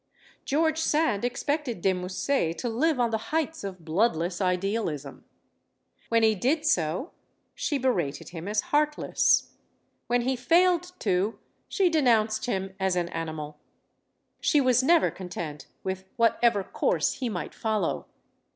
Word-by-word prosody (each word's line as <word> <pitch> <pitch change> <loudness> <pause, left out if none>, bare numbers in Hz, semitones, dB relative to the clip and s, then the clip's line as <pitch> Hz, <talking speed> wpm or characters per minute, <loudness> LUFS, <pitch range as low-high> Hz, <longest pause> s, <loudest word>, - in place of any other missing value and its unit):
George 315 +2 +1
Sand 305 -9 +1
expected 250 - -2
De 190 +2 +2
Musset 180 0 -1
to 245 - -3
live 280 +5 +1
on 235 -2 +2
the 220 0 -3
heights 320 -2 -1
of 185 -4 -7
bloodless 175 0 0
idealism. 180 -6 -2 0.8
When 230 -1 +3
he 220 0 +5
did 275 - 0
so, 180 - 0 0.4
she 290 - -1
berated 190 - -1
him 175 +1 -7
as 210 0 +1
heartless. 300 0 +2 0.6
When 245 0 +2
he 260 +2 0
failed 350 +6 +3
to, 195 +2 0 0.3
she 390 -2 +2
de 320 -3 +2
nounced 220 -2 +2
him 195 -4 -2
as 190 -1 +1
an 175 -1 -1
animal. 155 -3 -5 0.8
She 295 - +3
was 255 -2 +4
never 330 +5 +4
content 165 -5 -7 0.2
with 190 0 -4
whatever 230 -2 +3
course - - 0
he 250 -3 -1
might 180 -5 -5
follow. 215 -6 -1
225 Hz, 140 wpm, -27 LUFS, 180-280 Hz, 0.8 s, he